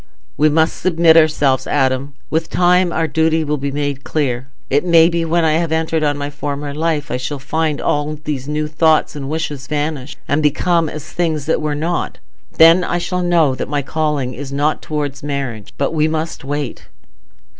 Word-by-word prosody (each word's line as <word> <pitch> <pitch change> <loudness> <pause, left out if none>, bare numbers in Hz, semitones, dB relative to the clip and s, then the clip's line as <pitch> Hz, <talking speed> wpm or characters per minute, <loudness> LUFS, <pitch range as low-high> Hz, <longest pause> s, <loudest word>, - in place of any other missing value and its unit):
"We 155 +2 +3
must 160 +2 +2
submit 165 -2 +4
ourselves, 150 -5 +3
Adam. 135 0 0 0.2
With 160 +1 -1
time, 180 0 +3
our 165 0 0
duty 160 +1 +1
will 150 -1 -2
be 140 +1 -2
made 145 -1 -3
clear. 130 -4 -2 0.2
It 145 +2 +1
may 170 -2 +5
be 170 -1 -1
when 165 0 +1
I 155 - +3
have 165 0 0
entered 160 0 0
on 145 -1 +1
my 145 0 -4
former 145 0 -4
life, 155 -1 -1
I 125 - 0
shall 130 +3 -4
find 155 +2 -1
all 150 +1 -1
these 145 -3 -5
new 150 +1 -1
thoughts 155 0 +2
and 140 -2 -5
wishes 150 -3 -4
vanish, 150 -2 -3
and 145 +2 +1
become 160 +2 +2
as 155 -1 -7
things 160 -4 -1
that 160 - 0
were 150 -1 -1
not. 165 +4 -2 0.4
Then 165 +3 +7
I 175 - -1
shall 180 +1 -2
know 170 -6 +3
that 130 - -5
my 145 -1 -1
calling 150 -4 -1
is 135 +2 -7
not 145 +2 0
towards 145 -2 -4
marriage. 135 -7 -4
But 140 +3 -1
we 155 -1 +2
must 160 -1 -3
wait." 145 -2 -4
150 Hz, 190 wpm, -18 LUFS, 145-160 Hz, 0.4 s, Then